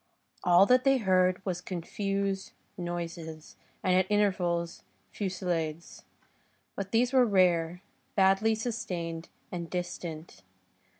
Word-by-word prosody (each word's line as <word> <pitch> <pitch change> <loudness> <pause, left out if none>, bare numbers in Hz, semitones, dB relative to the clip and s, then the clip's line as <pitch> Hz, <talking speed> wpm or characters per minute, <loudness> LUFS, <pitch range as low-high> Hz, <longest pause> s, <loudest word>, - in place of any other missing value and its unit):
All 180 +1 +6
that 250 +4 +4
they 270 -1 +4
heard 185 -3 +2
was 180 -2 -2
confused 195 +2 -3 0.2
noises, 170 -3 -6 0.3
and 185 - +3
at 185 +1 +3
intervals, 180 -5 +1 0.3
fusillades; 175 -5 -3 0.7
but 195 -1 -5
these 245 +3 +2
were 260 -1 +6
rare, 180 -4 +2 0.3
badly 195 +3 +4
sustained 180 -8 -4 0.2
and 170 -2 -5
distant. 175 - -5
185 Hz, 105 wpm, -29 LUFS, 170-200 Hz, 0.7 s, All